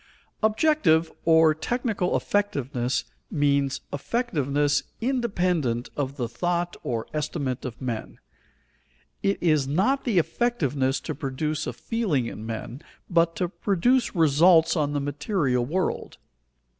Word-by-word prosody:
_ - - -29 0.4
Objective 215 - +3
or 160 -1 +6
technical 215 +1 -1
effectiveness 130 - -1 0.3
means 140 -2 +1
effectiveness 145 - 0 0.2
independent 180 - 0
of 140 0 -3
the 120 -3 -1
thought 175 +8 -1
or 115 -2 -3
estimate 145 -4 -2
of 120 -2 -6
men. 120 -4 -4 1.0
It 195 0 +1
is 155 -5 +2
not 195 - +1
the 225 -7 0
effectiveness 150 - +1
to - - -4
produce 150 +2 -3
a - - -3
feeling 200 - -1
in 110 -1 -6
men, 115 +4 -6 0.3
but 165 -1 +3
to 180 - 0
produce 205 +8 +1
results 165 +2 +5
on 145 -3 0
the 145 - 0
material 145 - 0
world. 185 +5 -2
155 Hz, 120 wpm, -25 LUFS, 135-185 Hz, 1.0 s, or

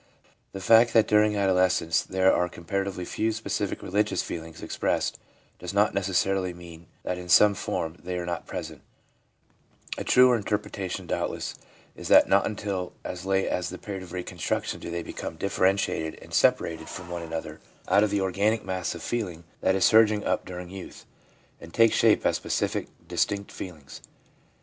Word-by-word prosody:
The 95 - -6
fact 115 +4 +5
that 110 -2 +5
dur 105 0 +5
ing 105 0 +2
adolescence 95 -4 +2
there 95 0 +2
are 90 0 +1
comparatively 95 +1 -3
few 110 +4 -1
specific 105 -2 -3
religious 105 +2 0
feelings 80 -1 -7
expressed - - -1 0.4
does 90 +2 -6
not 105 +1 +3
necessarily 95 -1 0
mean 85 -1 -12 0.2
that 90 0 -3
in 90 0 -9
some 105 +4 +7
form 80 -3 -3
they 90 0 -3
are 90 - -3
not 85 -1 -4
present; - - -6 1.2
a - - -3
truer 125 -1 +6
interpretation, 105 -3 -3
doubtless, - - -3 0.4
is - - -7
that - - +7
not 100 0 +3
until 100 -4 -4
as 90 +1 -6
late 95 0 +2
as 90 - -1
the 90 - -7
period 100 -1 -6
of 90 -2 -11
reconstruction 90 -1 -3
do - - -7
they 85 0 -3
become 80 - -6
differentiated 95 -3 0
and - - -14
separated 80 -1 +2
from 90 -1 -8
one 85 -1 -4
another 80 -1 -6 0.3
out 100 - +4
of 105 - +2
the 100 0 0
organic 100 +4 +1
mass 95 -2 -2
of 85 - -8
feeling 90 -8 -3 0.2
that 95 - +2
is 95 - +3
surging 110 -2 +5
up - - 0
during 90 0 -7
youth, 95 -1 -10 0.5
and 85 0 -12
take 115 -1 +5
shape - - +4
as - - +3
specific, - - -2 0.2
distinct 100 +3 -1
feelings. 75 -7 -9
95 Hz, 170 wpm, -26 LUFS, 90-100 Hz, 1.2 s, some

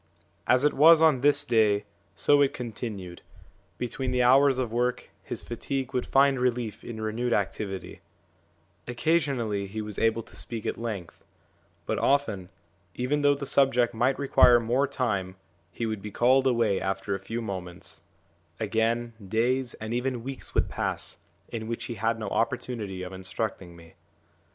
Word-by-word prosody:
As 130 +2 +4
it 150 - +3
was 160 +3 +7
on 155 -6 +4
this 145 +1 +4
day, 105 -5 +3 0.3
so 145 0 +4
it 140 - +2
continued; 105 -7 -6 0.6
between 125 +2 -3
the 125 0 +2
hours 135 +2 +5
of 125 -4 -2
work, 125 +1 -1
his - - -6
fatigue 130 +2 -4
would 125 - -1
find 135 -1 +4
relief 125 -3 -1
in 115 -2 -7
renewed 115 +3 -1
activity; 95 -1 -3 0.9
occasionally 120 -7 0
he 105 +3 -6
was 105 -1 -4
able 115 0 +1
to - - -18
speak 115 -3 -6
at - - -2
length; 105 -7 -6 0.6
but - - -1
often, 110 -10 +1 0.5
even 140 +4 0
though 145 0 +4
the 140 - -5
subject 125 -3 +3
might 125 +4 +1
require 125 -3 +5
more 120 +5 +1
time, 100 -9 -2 0.4
he 115 - -3
would 110 -2 -3
be 105 - -6
called 130 +5 +3
away 115 -6 +2
after 95 +1 -2
a 95 - -2
few 115 +5 -5
moments; 95 -6 -6 0.6
again, 115 +2 0
days 120 +5 0
and 110 +1 -5
even 125 -1 -2
weeks 135 +1 -7
would - - +3
pass, - - -3 0.3
in 110 -1 -5
which 115 0 -4
he 120 - -4
had 115 +1 0
no 110 -2 -5
opportunity 115 -5 -2
of 90 +1 -7
instructing 95 -1 -5
me. 85 -1 -16
120 Hz, 160 wpm, -27 LUFS, 105-130 Hz, 0.9 s, was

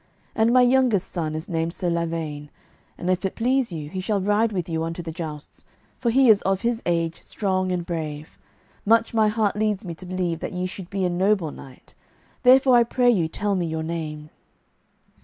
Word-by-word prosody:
And 225 +1 +2
my 250 0 +6
youngest 245 -6 +2
son 155 -3 -3
is 155 +2 -5
named 165 0 -2
Sir 180 - -2
Lavaine, 165 -3 -3 0.5
and 175 - -5
if 185 0 +1
it 190 - -2
please 250 0 +1
you, 155 -3 -5
he 185 +5 -5
shall 200 +2 0
ride 210 +3 +2
with 180 -4 -3
you 165 -2 -2
unto 165 +1 -4
the 165 - -5
jousts, 155 -2 -8 0.4
for 240 - 0
he 260 +3 +4
is 215 -3 +6
of 195 0 0
his 235 0 -1
age 165 -1 -1
strong 185 -2 -1
and 175 -1 -2
brave. 155 -3 -5 0.4
Much 230 +2 +3
my 220 -1 +4
heart 210 -1 +1
leads 210 -2 -1
me 170 - -5
to 180 +3 -11
believe 180 -3 -2
that - - -5
ye 180 0 -2
should 185 -1 -7
be 195 -2 -1
a - - +1
noble 185 -2 +1
knight; 130 -2 -14 0.5
therefore 260 0 +6
I 240 - +6
pray 245 +1 +2
you 175 -8 +1
tell 205 +5 -2
me 180 -3 0
your 160 0 -3
name." 155 -2 -5
185 Hz, 205 wpm, -24 LUFS, 165-215 Hz, 0.5 s, my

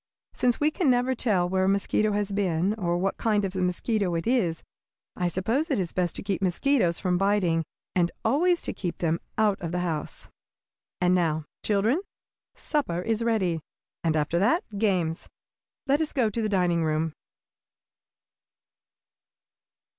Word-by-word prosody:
Since 245 -1 +1
we 300 +1 +3
can 315 -2 +1
never 250 +1 +3
tell 205 -8 +1
where 190 +1 +1
a - - +3
mosquito 200 +2 +1
has 205 -1 -1
been, 190 -1 +1
or 175 -5 -1
what 190 +2 -1
kind 210 -3 +1
of 190 0 -5
a 185 - -1
mosquito 180 +1 0
it 165 - -2
is, 210 -10 +1 0.5
I 180 - 0
suppose 225 - 0
it 275 - +1
is 175 -3 -2
best 175 -2 0
to - - -1
keep 195 -2 -2
mosquitoes 185 -1 +2
from 180 -2 0
biting, 195 -5 +2 0.3
and 175 -2 +3 0.2
always 340 +9 +2
to - - -2
keep 175 -4 -4
them 165 -1 0 0.2
out 210 -2 +2
of 170 -2 -3
the 180 0 -1
house. 155 -3 -4 0.7
And 180 0 +3
now, 160 -4 +1 0.2
children, 220 - +2 0.5
supper 180 - -1
is 225 +1 -1
ready, 205 -8 +1 0.4
and 160 -2 +1
after 155 +3 +1
that 245 - +3 0.2
games. 180 -6 0 0.6
Let 280 +3 +2
us 315 - -2
go 240 -6 +2
to 230 - -2
the 215 - 0
dining 175 -4 +2
room!" 155 0 0
195 Hz, 160 wpm, -26 LUFS, 175-225 Hz, 0.7 s, we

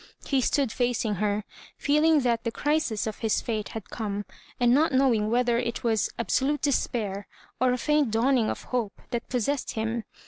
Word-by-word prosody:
He 270 -2 +1
stood 275 +1 +1
mcing 230 -3 0
her, 210 +1 0 0.3
feeling 300 +1 +3
that 235 -2 +1
the 230 - 0
crisis 295 -5 0
of 215 -1 -5
his 225 -2 +1
fate 215 -3 -3
had 220 - -10
come, 205 -2 -3 0.3
and 240 -1 +4
not 310 +5 +4
knowing 250 -6 +3
whether 240 0 +2
it 235 -1 -3
was 220 -4 +1
ab 235 - -3
solute 290 +2 +1
despair 215 -8 -1 0.3
or 255 +1 +3
a 250 - +1
faint 300 0 +2
dawning 230 +1 +2
of - - -4
hope 235 -5 -3
that 235 -1 -3
possessed 255 +3 -1
him. 225 +1 -2
240 Hz, 180 wpm, -27 LUFS, 220-265 Hz, 0.3 s, and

